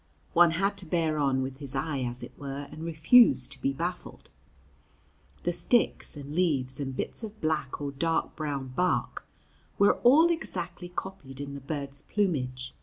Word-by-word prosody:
One 175 0 +7
had 200 +2 +1
to 185 - -2
bear 160 -2 +1
on 135 -2 +2
with 130 0 -5
his 140 -2 -5
eye, 140 +1 -1
as 125 -1 -4
it - - -8
were, 140 0 -6
and 155 - -8
refuse 160 - +5
to 140 - -7
be 135 - +1
baffled. 175 +6 -5 1.1
The - - 0
sticks 240 -9 +1
and 145 0 -7
leaves, 145 -7 +1
and 135 -2 -3
bits - - -3
of 215 0 -7
black 155 -4 -1
or 145 -1 -3
dark 165 +4 -1
brown 140 -4 -3
bark, 180 +8 -1 0.5
were 200 - +5
all 310 +8 +6
exactly 180 - -4
copied 175 -8 -7
in 140 0 -5
the 140 - -7
bird's 140 0 -5
plumage. 130 -12 -1
150 Hz, 170 wpm, -28 LUFS, 135-180 Hz, 1.1 s, One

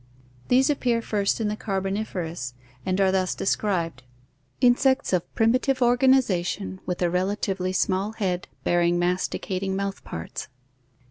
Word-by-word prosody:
These 260 +3 +4
appear 245 -5 +1
first 205 -1 0
in 220 - 0
the 210 - -1
Carboniferous 190 - -3 0.3
and 185 +1 +1
are 190 -1 +4
thus 185 -1 0
described: 170 - -1 0.6
Insects 260 0 +3
of 180 -2 0
primitive 255 +4 +2
organiza 245 -6 +4
tion, 190 +1 -4
with 180 0 -1
a 175 - +3
relatively 190 0 -1
small 190 +3 0
head 185 -5 -2 0.2
bear 175 0 +2
ing 175 0 +3
masticating 185 +2 -1
mouth 200 0 -3
parts. 80 0 -6
195 Hz, 135 wpm, -25 LUFS, 180-225 Hz, 0.6 s, These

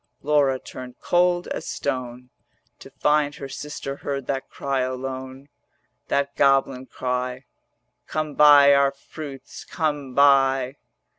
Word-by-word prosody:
Laura 140 -2 +2
turned 125 -1 -10
cold 175 0 +1
as - - -5
stone 125 -2 -4 0.5
To - - -12
find 145 +1 +1
her 140 - -7
sister 140 0 -6
heard 140 -2 -4
that 135 0 -3
cry 140 -1 -2
alone, 130 +1 -5 0.6
That 140 0 -1
goblin 135 -2 +2
cry, 125 +1 -3 0.6
'Come 155 -1 -3
buy 145 -1 +7
our 140 0 +4
fruits, 140 -1 -10
come 145 -5 -3
buy.' 135 -1 +4
135 Hz, 120 wpm, -23 LUFS, 130-145 Hz, 0.6 s, buy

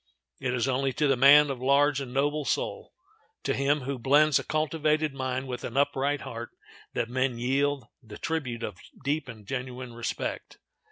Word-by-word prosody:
It 125 -2 -1
is 125 +1 0
only 135 0 0
to 150 +4 +1
the 135 - +4
man 140 +3 +7
of 130 -2 -6
large 140 +1 +3
and 130 -3 -6
noble 145 +3 0
soul—to 430 - -4
him 140 +2 +1
who 135 0 -4
blends 145 +4 +4
a - - -5
cultivated 155 -1 0
mind 130 0 -3
with 125 -1 -5
an 120 - -4
upright 140 0 +1
heart—that 115 -2 -7
men 130 0 0
yield 135 +2 0 0.2
the 110 -4 -11
tribute 130 -8 -3
of 90 -4 -5 0.2
deep 145 0 -1
and 110 -4 -10
genuine 125 0 -5
respect. 120 0 -4
135 Hz, 165 wpm, -28 LUFS, 125-145 Hz, 0.2 s, man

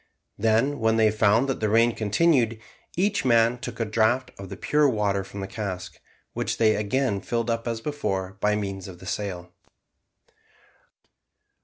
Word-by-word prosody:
Then 115 +7 +2
when 110 0 +2
they 110 -1 +4
found 110 +4 +3
that 135 - -2
the 110 - 0
rain 115 +2 +4
continued, 115 +1 +2 0.4
each 200 +3 +1
man 120 -1 +3
took - - -7
a 115 - +1
draught 115 +4 +1
of 100 -1 -8
the - - -7
pure 150 -1 +2
water 100 -4 0
from 100 +1 -8
the 95 - -4
cask, 95 -3 -6 0.3
which - - -2
they 110 -1 +4
again 105 0 0
filled 115 +3 -1
up 115 +1 -2
as 115 -1 -2
before 95 -10 -3
by 105 +1 +2
means 100 -2 -4
of 90 -2 -10
the 95 - -13
sail. 90 -3 -4
110 Hz, 165 wpm, -25 LUFS, 100-120 Hz, 0.4 s, they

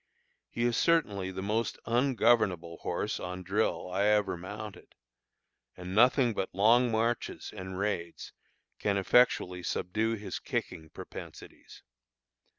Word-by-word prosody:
He 120 - -3
is 120 -1 +1
certainly 105 - +2
the 95 0 -5
most 105 +2 -1
ungovernable 115 -9 +2
horse - - -3
on 90 0 -6
drill 90 -2 -1
I 100 +3 +1
ever 105 -3 +2
mounted; 105 +4 -9 0.8
and 90 +1 -7
nothing 120 +2 +4
but 95 -2 -2
long 120 +5 +5
marches 115 +1 -1
and 95 0 -6
raids 95 -4 -3 0.5
can 100 -1 0
effectually 95 -4 +3
subdue 110 +6 -1
his 105 -1 -6
kicking 80 0 -4
propensities. - - -11
105 Hz, 120 wpm, -30 LUFS, 95-115 Hz, 0.8 s, long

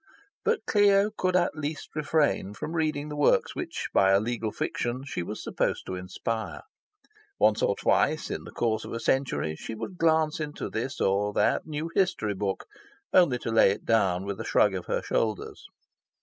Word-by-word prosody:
But 455 0 +1
Clio 205 0 +4
could 185 -2 0
at 180 - +2
least 155 0 -4
refrain 150 - +1
from 155 - -5
reading 155 -3 -1
the 150 - -5
works 145 - +2
which, - - -4
by 95 - +5
a 95 - +5
legal 115 0 -2
fiction, 120 +4 -3
she 140 - -3
was 105 +5 -6
supposed - - -1
to - - -5
inspire. 95 +4 -4 0.7
Once 105 0 +3
or 100 - +2
twice - - +1
in - - -4
the - - -10
course 110 -2 0
of - - -7
a 115 - -3
century, 120 - 0
she 110 - -7
would 115 - -7
glance 160 -1 +2
into 150 -1 -4
this 130 +5 -3
or 100 +2 +1
that - - +1
new 155 +2 -4
history 180 - +1
book, 100 0 -3 0.5
only 170 -9 +5
to 115 - -4
lay 115 -3 +6
it 100 - -3
down 95 -5 +2
with 100 -1 -4
a - - -3
shrug - - +3
of - - -5
her - - -1
shoulders. 110 -3 -2
120 Hz, 185 wpm, -27 LUFS, 105-155 Hz, 0.7 s, lay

